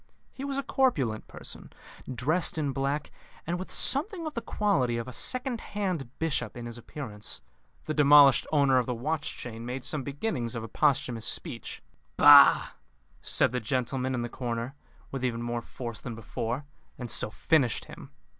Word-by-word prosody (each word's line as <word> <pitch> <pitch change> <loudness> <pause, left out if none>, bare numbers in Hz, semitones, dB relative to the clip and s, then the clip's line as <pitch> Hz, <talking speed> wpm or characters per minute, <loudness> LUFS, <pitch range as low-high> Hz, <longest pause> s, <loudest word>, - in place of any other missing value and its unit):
He 270 - -8
was 275 -1 -3
a 275 - -1
corpulent 145 - 0
person, - - -10 0.4
dressed 155 +9 0
in 145 -3 0
black, 140 +2 -2 0.3
and 175 +2 -2
with 185 - -6
something 335 - +4
of 310 - -4
the 235 - -3
quality 135 - 0
of 115 - -4
a 130 - -7
second 255 - -1
hand 185 - -3
bishop 140 -9 -2
in 120 - -6
his 120 -1 -7
appearance. 110 -5 -5 0.5
The 155 - -2
demolished 145 -2 +6
owner 140 -4 +4
of 125 - -2
the 125 - -1
watch 150 +6 -3
chain 115 -2 -7
made 125 +2 -5
some 150 - -2
beginnings 135 - -3
of 115 - -4
a - - -6
posthumous 130 -5 +1
speech. - - -5 0.3
"Bah!" - - +8 0.5
said - - +2
the 125 - -1
gentleman 130 +3 -1
in 120 - -2
the - - -2
corner, 120 +1 -4 0.4
with 135 -2 -4
even 120 -2 -1
more 120 0 -2
force 115 -1 -6
than 120 -4 -6
before, 115 +4 -4 0.3
and 125 -2 -4
so - - +3
finished 125 - +1
him. - - -11
135 Hz, 175 wpm, -28 LUFS, 120-155 Hz, 0.5 s, Bah